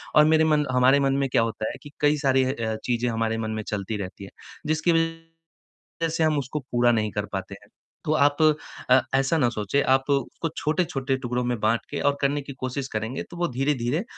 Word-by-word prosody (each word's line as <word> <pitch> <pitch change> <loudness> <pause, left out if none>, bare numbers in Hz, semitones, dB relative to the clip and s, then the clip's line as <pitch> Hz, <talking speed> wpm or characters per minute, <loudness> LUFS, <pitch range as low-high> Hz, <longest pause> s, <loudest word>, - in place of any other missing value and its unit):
और 150 0 +7
मेरे 160 0 +4
मन 150 -1 +2
हमारे 130 +2 +4
मन 135 -1 +2
में - - +1
क्या 115 - +3
होता 110 -1 -2
है - - -8
कि 145 - -11
कई 150 0 +3
सारी 135 -2 +2
अ, 115 -4 -2
चीजें 120 0 0
हमारे 115 0 -1
मन 110 -1 -3
में 110 - -3
चलती 105 +1 -3
रहती 100 0 -7
है, 95 - -9 0.4
जिसकी 155 +2 +2
वज़ह 165 0 -4 0.5
से 160 0 0
हम 155 -2 +2
उसको 140 +3 -4
पूरा 120 0 +4
नहीं 110 -2 0
कर - - -2
पाते - - -4
हैं, - - -20 0.4
तो 155 - +1
आप 145 0 +3 0.5
अ, 130 +1 +7 0.2
ऐसा 135 +4 +2
न 125 -5 +3
सोचें, 110 +6 0
आप 135 +1 +2
उसको 140 +4 -1
छोटे-छोटे 150 -4 0
टुकड़ों 125 -1 -2
में 120 -2 -1
बाँट 110 +2 +1
के 145 - -3
और 140 0 +2
करने 140 +1 +1
की 140 0 -8
कोशिश 130 +1 -3
करेंगे, 110 +4 -3
तो 175 - -10
वो 175 0 0
धीरे-धीरे 135 - 0
135 Hz, 215 wpm, -25 LUFS, 120-150 Hz, 0.5 s, और